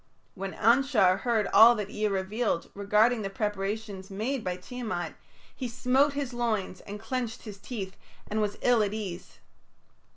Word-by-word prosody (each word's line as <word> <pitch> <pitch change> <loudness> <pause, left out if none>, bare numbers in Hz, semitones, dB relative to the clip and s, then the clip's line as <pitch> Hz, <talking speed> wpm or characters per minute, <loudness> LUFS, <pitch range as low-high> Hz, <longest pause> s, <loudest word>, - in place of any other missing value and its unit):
When 195 -1 -5
Anshar 230 -6 +4
heard 230 -4 +1
all 225 +4 +9
that 210 -3 -4
Ea 215 0 0
revealed 195 0 -1
regarding 210 +4 +3
the 195 - -3
preparations 200 -1 -3
made 225 +6 -2
by 180 -1 -2
Tiamat, 220 -3 -4 0.4
he 255 - -4
smote 260 +4 +2
his 280 -3 -3
loins 225 -6 -2
and 205 +1 -6
clenched 240 0 -4
his 205 -3 -9
teeth, 195 -5 -6 0.3
and 215 +1 -1
was 205 -1 -1
ill 245 -2 +4
at 210 0 0
ease. 195 -5 -6
215 Hz, 155 wpm, -28 LUFS, 195-240 Hz, 0.4 s, all